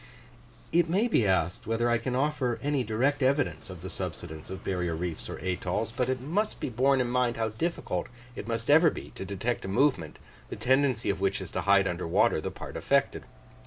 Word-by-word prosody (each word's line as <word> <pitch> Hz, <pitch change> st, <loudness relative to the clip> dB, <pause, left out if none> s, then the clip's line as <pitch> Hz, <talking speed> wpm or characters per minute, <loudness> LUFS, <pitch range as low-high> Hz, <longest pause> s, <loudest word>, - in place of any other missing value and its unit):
It 170 Hz, 0 st, +3 dB
may 200 Hz, +8 st, +2 dB
be 120 Hz, -, +2 dB
asked, 90 Hz, -1 st, 0 dB
whether 115 Hz, +1 st, +1 dB
I 120 Hz, -1 st, +2 dB
can 125 Hz, +2 st, -2 dB
offer 130 Hz, -3 st, 0 dB
any 145 Hz, -2 st, +1 dB
direct 130 Hz, +6 st, 0 dB
evidence 135 Hz, -3 st, +1 dB
of 90 Hz, -2 st, -9 dB
the 95 Hz, -, -5 dB
subsidence 80 Hz, -3 st, -6 dB
of 95 Hz, +1 st, -7 dB
barrier 90 Hz, -3 st, -1 dB
reefs 85 Hz, 0 st, -4 dB
or -, -, -5 dB
atolls; 95 Hz, +4 st, -1 dB
but 125 Hz, 0 st, 0 dB
it 130 Hz, -1 st, 0 dB
must 180 Hz, -, -1 dB
be -, -, -2 dB
borne 130 Hz, +3 st, +3 dB
in 125 Hz, -, +1 dB
mind 125 Hz, -1 st, +1 dB
how 110 Hz, -1 st, 0 dB
difficult 110 Hz, -, -2 dB, 0.3 s
it -, -, -6 dB
must 115 Hz, +3 st, -1 dB
ever 160 Hz, +2 st, +7 dB
be -, -, -8 dB
to -, -, -7 dB
detect 100 Hz, +5 st, -2 dB
a -, -, -5 dB
movement, 110 Hz, -, +1 dB, 0.3 s
the -, -, -5 dB
tendency 130 Hz, -4 st, +2 dB
of 95 Hz, -1 st, -5 dB
which 100 Hz, 0 st, +1 dB
is 95 Hz, -, -7 dB
to -, -, -2 dB
hide 100 Hz, -1 st, +4 dB
under 90 Hz, -1 st, -3 dB
water 80 Hz, -, +3 dB
the -, -, -3 dB
part -, -, -8 dB
affected. -, -, +1 dB
115 Hz, 210 wpm, -28 LUFS, 95-135 Hz, 0.3 s, ever